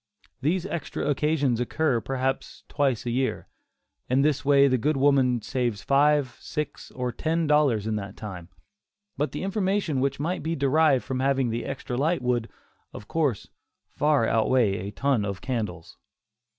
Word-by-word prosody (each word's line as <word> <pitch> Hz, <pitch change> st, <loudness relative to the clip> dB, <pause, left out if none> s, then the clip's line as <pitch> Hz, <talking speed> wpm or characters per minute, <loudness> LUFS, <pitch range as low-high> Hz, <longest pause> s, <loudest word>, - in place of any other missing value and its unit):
These 170 Hz, +6 st, 0 dB
extra 170 Hz, -7 st, -4 dB
occasions 145 Hz, -4 st, +1 dB
occur, 125 Hz, 0 st, 0 dB
perhaps, 135 Hz, +1 st, -3 dB
twice 135 Hz, -6 st, 0 dB
a 120 Hz, -, -1 dB
year. 130 Hz, +2 st, -1 dB, 0.6 s
In 130 Hz, +2 st, +3 dB
this 145 Hz, -1 st, +1 dB
way 140 Hz, -1 st, +5 dB
the 130 Hz, -2 st, +2 dB
good 150 Hz, +5 st, +1 dB
woman 130 Hz, -4 st, +3 dB
saves 120 Hz, -6 st, -2 dB
five, 145 Hz, -2 st, +2 dB
six, 150 Hz, -1 st, -5 dB
or 125 Hz, -1 st, -3 dB
ten 160 Hz, +7 st, -1 dB
dollars 145 Hz, -8 st, +3 dB
in 110 Hz, -1 st, -1 dB
that 100 Hz, -1 st, -7 dB
time; 90 Hz, -5 st, -8 dB, 0.7 s
but 150 Hz, -, -1 dB
the -, -, -5 dB
information 195 Hz, -6 st, 0 dB
which 140 Hz, 0 st, -1 dB
might 170 Hz, +5 st, -2 dB
be 165 Hz, +2 st, -2 dB
derived 140 Hz, -1 st, +3 dB
from 130 Hz, -1 st, -3 dB
having 135 Hz, -2 st, +1 dB
the 115 Hz, +1 st, -3 dB
extra 130 Hz, -2 st, -4 dB
light 155 Hz, +1 st, +1 dB
would, 120 Hz, -2 st, 0 dB, 0.4 s
of 105 Hz, -, -10 dB
course, 145 Hz, -10 st, -1 dB, 0.4 s
far 145 Hz, -6 st, +1 dB
outweigh 110 Hz, -4 st, +2 dB
a -, -, -5 dB
ton 135 Hz, -2 st, +1 dB
of 100 Hz, -1 st, -3 dB
candles. 105 Hz, -10 st, -4 dB
135 Hz, 160 wpm, -26 LUFS, 120-150 Hz, 0.7 s, way